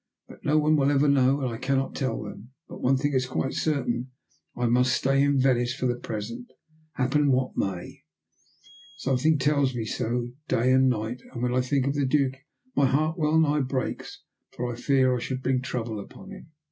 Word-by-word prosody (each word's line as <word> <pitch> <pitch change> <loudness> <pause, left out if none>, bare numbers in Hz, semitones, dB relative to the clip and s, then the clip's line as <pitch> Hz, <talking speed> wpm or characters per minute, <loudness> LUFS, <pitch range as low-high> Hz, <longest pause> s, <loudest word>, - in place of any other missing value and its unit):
But - - -15
no 150 +1 +2
one 155 0 +3
will 140 -1 +3
ever 145 +1 +3
know, 140 0 +3
and 130 - -1
I 115 - -5
cannot 135 0 0
tell 130 -5 -2
them. 105 +4 -10
But - - -10
one 135 +1 +3
thing 145 +2 -1
is 130 -1 +1
quite 135 +1 -2
certain. 130 -5 -1 0.5
I 120 - 0
must 125 +2 +3
stay 135 +1 +2
in 145 0 +3
Venice 125 -2 +2
for - - -3
the 125 - +2
present 115 +3 -6 0.5
happen 140 +2 +2
what 130 0 0
may. 95 -3 -4 1.0
Something 135 +4 +1
tells 140 -2 +1
me 115 -2 -2
so, 120 +2 -2 0.2
day 125 +3 +2
and 130 0 +5
night. 120 +1 -2
And 120 - -5
when 125 0 0
I 130 - +2
think 130 +1 0
of 140 - 0
the 145 -2 0
Duke 135 -1 +2 0.4
my 140 - +4
heart 155 +5 +1
well 160 -2 +2
nigh 150 -1 +3
breaks 130 0 -4 0.3
for 120 -1 -4
fear 130 0 +2
I - - -2
should 130 +2 -4
bring 130 -1 +1
trouble 115 -4 -4
upon 190 - -11
him." 195 -5 -11
130 Hz, 195 wpm, -26 LUFS, 125-140 Hz, 1.0 s, and